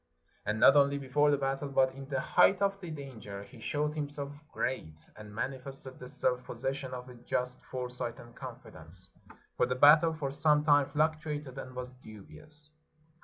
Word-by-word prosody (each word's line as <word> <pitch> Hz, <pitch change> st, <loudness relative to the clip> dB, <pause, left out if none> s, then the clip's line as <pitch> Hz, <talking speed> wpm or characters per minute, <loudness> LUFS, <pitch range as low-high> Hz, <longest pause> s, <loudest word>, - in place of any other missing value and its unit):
" -, -, -38 dB
And 105 Hz, +1 st, 0 dB
not 135 Hz, -, +8 dB
only 140 Hz, 0 st, +5 dB
before 140 Hz, +2 st, +2 dB
the 145 Hz, -, +4 dB
battle, 135 Hz, +1 st, -1 dB
but 130 Hz, -1 st, +3 dB
in 135 Hz, +1 st, -9 dB
the 135 Hz, -2 st, 0 dB
height 195 Hz, -, +4 dB
of 195 Hz, 0 st, +1 dB
the 175 Hz, -, -6 dB
danger, 125 Hz, -10 st, -7 dB
he 115 Hz, +4 st, -14 dB
showed 150 Hz, +6 st, -1 dB
himself 145 Hz, -2 st, -4 dB, 0.2 s
great, 80 Hz, -11 st, -3 dB, 0.2 s
and 105 Hz, -1 st, -11 dB
manifested 130 Hz, +2 st, -5 dB
the 125 Hz, -, -8 dB
self 125 Hz, 0 st, 0 dB
possession 135 Hz, +2 st, -4 dB
of 125 Hz, 0 st, -7 dB
a 125 Hz, -, -10 dB
just 125 Hz, +1 st, -3 dB
foresight 125 Hz, -2 st, -4 dB
and 120 Hz, 0 st, -13 dB
confidence. 85 Hz, +3 st, -8 dB, 0.5 s
For -, -, +3 dB
the 125 Hz, -, 0 dB
battle 155 Hz, +4 st, +7 dB
for 140 Hz, -4 st, -3 dB
some 150 Hz, +1 st, +3 dB
time 145 Hz, -2 st, +5 dB
fluctuated 150 Hz, -3 st, -1 dB
and 130 Hz, -1 st, -8 dB
was 125 Hz, 0 st, -5 dB
dubious. 150 Hz, +8 st, -11 dB
135 Hz, 175 wpm, -31 LUFS, 125-150 Hz, 0.5 s, not